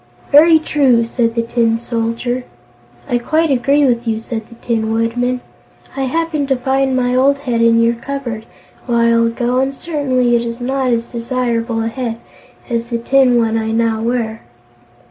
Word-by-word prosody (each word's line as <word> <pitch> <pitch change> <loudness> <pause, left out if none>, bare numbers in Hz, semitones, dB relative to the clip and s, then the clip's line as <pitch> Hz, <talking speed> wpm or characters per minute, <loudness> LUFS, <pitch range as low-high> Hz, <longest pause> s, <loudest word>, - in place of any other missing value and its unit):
"Very 320 +3 +7
true," 270 -7 +2
said 230 0 -1
the 230 - +1
Tin 230 -1 +1
Soldier. 235 +2 -3 0.6
"I 240 - 0
quite 315 +5 +1
agree 275 +3 +3
with 240 -2 0
you," 220 -1 0
said 225 -1 -6
the 235 - -14
Tin 225 -2 -2
Woodman. 245 +3 -1 0.5
"I 270 -1 -1
happened 310 +1 -1
to 270 - +2
find 265 +1 0
my 250 -1 +1
old 270 +2 +3
head 245 -4 -2
in 230 0 +4
your 230 0 +3
cupboard, 235 -2 -6 0.4
a - - -4
while 230 0 +3
ago, 240 +2 -1
and 270 +1 -1
certainly 260 -7 0
it 235 - +2
is 235 0 -5
not 260 +1 -1
as 230 -1 0
desirable 235 -1 -2
a - - -1
head 230 -1 -4 0.5
as 235 -1 -2
the 235 -1 -2
tin 250 +1 +3
one 225 -1 +1
I 220 0 -2
now 225 -1 0
wear." 230 -1 -2
240 Hz, 175 wpm, -16 LUFS, 230-265 Hz, 0.6 s, Very